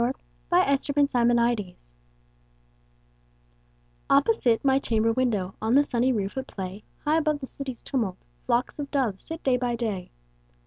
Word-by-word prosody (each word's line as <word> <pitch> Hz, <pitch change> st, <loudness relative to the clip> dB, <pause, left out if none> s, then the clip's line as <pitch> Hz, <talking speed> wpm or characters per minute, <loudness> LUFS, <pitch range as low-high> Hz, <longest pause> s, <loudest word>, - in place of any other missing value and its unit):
Louisa 245 Hz, +3 st, +1 dB, 0.4 s
May 350 Hz, +1 st, +6 dB
Alcott 275 Hz, -4 st, +2 dB
My 235 Hz, 0 st, +3 dB
Doves 180 Hz, -, -7 dB, 2.2 s
OPPOSITE 275 Hz, -, +3 dB
my 270 Hz, 0 st, +4 dB
chamber 225 Hz, -3 st, +1 dB
window, 215 Hz, -7 st, 0 dB
On 225 Hz, +3 st, +2 dB
the 285 Hz, -, +6 dB
sunny 255 Hz, -2 st, +1 dB
roof, 200 Hz, -5 st, -2 dB
at 265 Hz, -, -6 dB
play, 190 Hz, +1 st, -6 dB, 0.2 s
High 305 Hz, +2 st, +3 dB
above 305 Hz, -2 st, 0 dB
the 270 Hz, -, -5 dB
city's 265 Hz, -2 st, -7 dB
tumult, 225 Hz, -9 st, -1 dB, 0.3 s
Flocks 245 Hz, +5 st, 0 dB
of 285 Hz, -1 st, -4 dB
doves 245 Hz, -9 st, 0 dB
sit 325 Hz, 0 st, -6 dB
day 260 Hz, -2 st, +3 dB
by 245 Hz, -1 st, -1 dB
day. 215 Hz, -6 st, -3 dB
245 Hz, 150 wpm, -26 LUFS, 220-275 Hz, 2.2 s, May